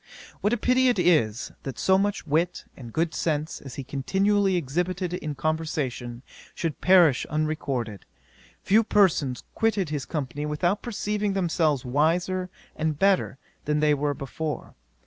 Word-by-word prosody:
'What 225 +4 +1
pity 255 +1 +3
it 245 - +3
is, 150 - +2
that 135 -4 -6
so 190 - +3
much 205 -2 -1
wit 165 +4 0
and 120 -4 -10
good 165 +3 0
sense 155 -1 -2
as 135 -3 -9
he 140 - -5
continually 195 +9 +1
exhibited 175 +3 -1
in 155 -4 -4
conversation, 140 -6 -3 0.3
should 165 -3 -3
perish 175 -8 +5
unrecorded! 140 - -2 0.6
Few 215 +4 +4
persons 165 - +2
quitted 205 -7 +1
his 145 -2 -3
company 150 -1 -3
without 175 +7 0
perceiving 210 -3 -2
themselves 160 -7 +1
wiser 175 +7 +1 0.3
and 155 -1 -1
better 195 -6 +2 0.3
than 150 0 +1
they 150 0 +4
were 145 0 0
before. 145 +3 -5
160 Hz, 140 wpm, -26 LUFS, 145-190 Hz, 0.6 s, perish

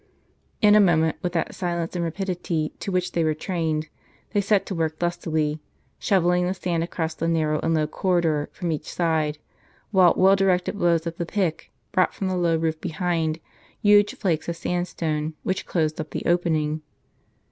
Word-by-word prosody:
In 210 0 +7
a 210 - +7
moment, 160 -5 +3
with 175 -1 -2
that 165 - -1
silence 170 -2 -3
and 175 - -1
rapidity 170 -2 -2
to 195 - -4
which 180 -1 0
they 170 - 0
w^ere 155 -1 0
trained, 160 -3 -2 0.4
they 205 - +2
set 200 0 +2
to - - -4
work 160 -2 -1
lustily, 160 -3 -1 0.4
shovelling 180 -2 +2
the 185 - -1
sand 175 -3 -1
across 165 -1 -3
the 165 - -3
narrow 155 -2 +1
and 165 0 +1
low 155 -1 +2
corridor 165 -2 0
from 175 -2 -3
each 155 - -4
side, 160 -3 0 0.5
while 185 -4 +5
well 190 +1 +6
directed 190 -1 +1
blows 170 -4 +2
of 170 0 -4
the 170 - -2
pick 180 -6 -2 0.2
brought 185 - +2
from 190 - -2
the - - -1
low^ 170 -3 +1
roof 160 -1 -1
behind, 165 -2 -1 0.4
huge 205 -1 +4
flakes 170 -5 -1
of 170 - -2
sandstone, 160 -3 -2
which 190 0 -2
closed 155 -3 0
up 155 - -8
the - - -5
opening. 160 -3 +1
170 Hz, 180 wpm, -24 LUFS, 160-180 Hz, 0.5 s, In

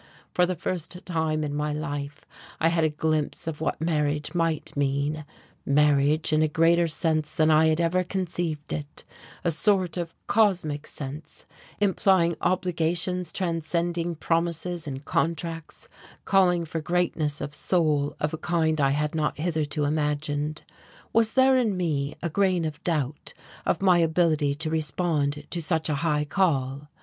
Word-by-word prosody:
For 180 0 +3
the 185 - -1
first 180 +1 -4
time 160 -3 -1
in 145 -1 -3
my 150 0 -1
life 145 -1 -5 0.3
I 165 - +3
had 165 -1 +1
a 155 - +3
glimpse 155 0 -1
of 160 -2 -5
what - - -1
marriage 150 -2 0
might 165 -3 -1
mean, 145 +2 -1 0.4
marriage 150 +2 +3
in 155 - +4
a 155 - +4
greater 165 +2 +3
sense 155 -1 0
than 160 -2 +4
I 155 +1 +5
had 160 0 +2
ever 170 +2 +2
conceived 175 -4 -3
it, 150 -1 -6 0.4
a 170 - +2
sort 185 +1 +1
of 170 -2 -4
cosmic 180 -9 +1
sense, 145 +2 -8 0.3
implying 190 -4 +3
obligations 180 0 0
transcending 170 -1 -1
promises 170 +1 -1
and 135 0 -6
contracts, 165 0 -2 0.4
calling 180 -3 +3
for 160 0 -4
greatness 160 -3 0
of 145 - -5
soul 155 -4 +1
of 150 +1 -1
a 160 - -4
kind 160 -3 +1
I 135 - +4
had 150 0 -1
not 155 -2 -1
hitherto 155 -2 -1
imagined. 150 0 -1 0.5
Was 225 -1 +3
there 265 0 +5
in 225 -7 +1
me 150 -5 -1
a 170 - 0
grain 185 -2 +2
of 150 -1 -5
doubt 150 -4 -2 0.3
of - - +1
my 180 -3 +5
ability 160 -3 +2
to 155 +2 -2
respond 150 -2 -1
to 170 - -2
such 160 0 0
a 150 - +1
high 150 -2 +1
call? 145 -5 0
160 Hz, 155 wpm, -26 LUFS, 150-175 Hz, 0.5 s, I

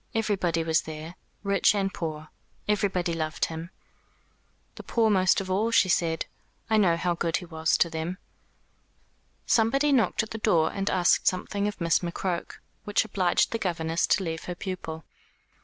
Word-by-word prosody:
Everybody 190 -7 0
was 160 -1 +2
there 160 +1 -8 0.3
rich 200 +1 +3
and 195 -1 -1
poor. 155 -2 -5 0.4
Everybody 190 -4 0
loved 155 -1 -1
him." 165 +1 -7 1.0
"The - - -9
poor 225 -2 +1
most 185 -2 +4
of 190 -1 -5
all," 210 +5 +1
she 230 -5 +4
said. 165 -2 +1 0.5
"I 220 - +5
know 180 -5 +4
how 175 +1 0
good 170 -1 0
he 185 - -7
was 160 -1 0
to - - +3
them." 165 +2 -4 1.3
Somebody 275 +6 +3
knocked 240 -3 +2
at 220 - -9
the 225 - -5
door 170 -7 +2
and 195 0 -1
asked 180 -1 +3
something 200 +2 0
of 210 - -5
Miss 165 -3 +2
McCroke, 175 0 -3 0.3
which 205 +1 +1
obliged 185 -4 +1
the 230 - -2
governess 165 -3 -1
to 190 - +2
leave 165 -2 -4
her 180 - -4
pupil. 175 -4 -6
180 Hz, 165 wpm, -27 LUFS, 165-205 Hz, 1.3 s, I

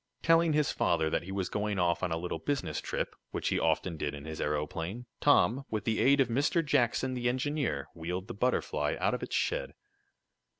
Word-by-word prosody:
Telling 165 -1 +4
his 150 -1 +2
father 80 0 +1
that - - +1
he 95 - -8
was 95 -1 -1
going 105 -1 -2
off 85 -2 +1
on 90 - -1
a 80 - 0
little 90 +2 -4
business 145 -2 -2
trip, - - -3
which - - -2
he - - +1
often 85 -3 0
did 75 -1 -2
in 70 +1 -9
his 80 0 -5
aeroplane, 80 +9 -2
Tom, 120 +10 +4
with 110 -1 -2
the 110 -1 0
aid 140 +2 +5
of 135 - +4
Mr. 145 +7 +1
Jackson, 130 -2 +2
the 120 -1 0
engineer, 130 - -1
wheeled 90 +4 -4
the 120 - -5
Butterfly 125 +4 0
out - - +1
of - - -2
its - - -3
shed. - - -1
110 Hz, 205 wpm, -31 LUFS, 85-140 Hz, -, aid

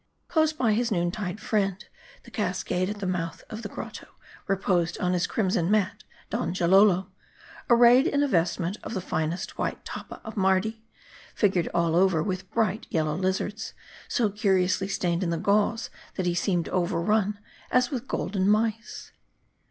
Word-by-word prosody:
Close 315 -2 +3
by 250 -8 +1
his 235 +2 0
noon 175 -3 +1
tide 190 0 -4
friend, 200 -2 -1 0.4
the - - -15
cascade 185 +1 -1
.at 210 - -4
the 200 - -4
mouth 175 -2 -3
of 220 - -5
the 210 - -6
grotto, - - -8 0.4
reposed 180 -3 +1
on 180 0 +1
his 180 0 +1
crimson 190 -7 0
mat, 205 -3 +1 0.3
Donjalolo: 185 +2 +3 0.6
ar 240 - +6
rayed 245 +5 +7
in 285 -4 +2
a - - +2
vestment 175 -1 0
of 230 - -6
the - - 0
finest 165 -1 -3
white - - -3
tappa - - -7
of 220 - -8
Mardi, 195 +3 +1 0.5
fig 205 -3 +3
ured 175 -2 +1
all 170 -1 +1
over 180 -3 +3
with 185 0 -4
bright 220 -2 0
yellow 155 -2 0
lizards, 190 +4 -2 0.3
so 220 -4 +1
curiously 190 -2 +1
stained 175 -3 -1
in 180 - 0
the 170 - 0
gauze, 210 +5 +1 0.2
that 185 - -2
he 175 - +1
seemed 175 -1 0
overrun, 190 +3 +1 0.3
as 250 -1 +2
with 260 -1 -4
golden 190 0 0
mice. 225 +2 -1
190 Hz, 165 wpm, -26 LUFS, 180-215 Hz, 0.6 s, rayed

